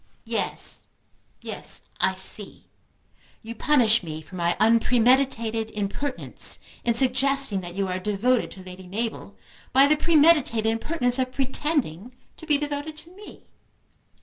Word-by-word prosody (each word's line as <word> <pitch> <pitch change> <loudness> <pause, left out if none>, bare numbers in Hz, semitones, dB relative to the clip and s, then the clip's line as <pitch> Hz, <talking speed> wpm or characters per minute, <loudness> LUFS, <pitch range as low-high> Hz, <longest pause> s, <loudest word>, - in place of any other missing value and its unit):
"Yes; - - -3 0.6
yes. - - -4 0.2
I - - +2
see. - - -4 0.8
You 225 +1 -6
punish 235 -4 +3
me 155 -3 -6
for 155 - -19
my 170 -1 0
unpremeditated 230 0 +2
impertinence 210 +7 -2 0.3
in 235 -1 +1
suggesting 265 -3 +2
that 175 0 -9
you 195 0 -1
are 185 0 -2
devoted 210 +6 +1
to 190 - -11
Lady 185 0 -11
Mabel 220 +5 -5 0.4
by 270 +2 +7
the 300 +2 +4
premeditated 300 -8 +3
impertinence 245 +3 0
of 255 0 0
pretending 255 - -2 0.2
to 320 - -12
be 300 -2 +4
devoted 295 +1 -4
to 330 +3 -11
me." 415 +1 -13
245 Hz, 130 wpm, -25 LUFS, 210-280 Hz, 0.8 s, by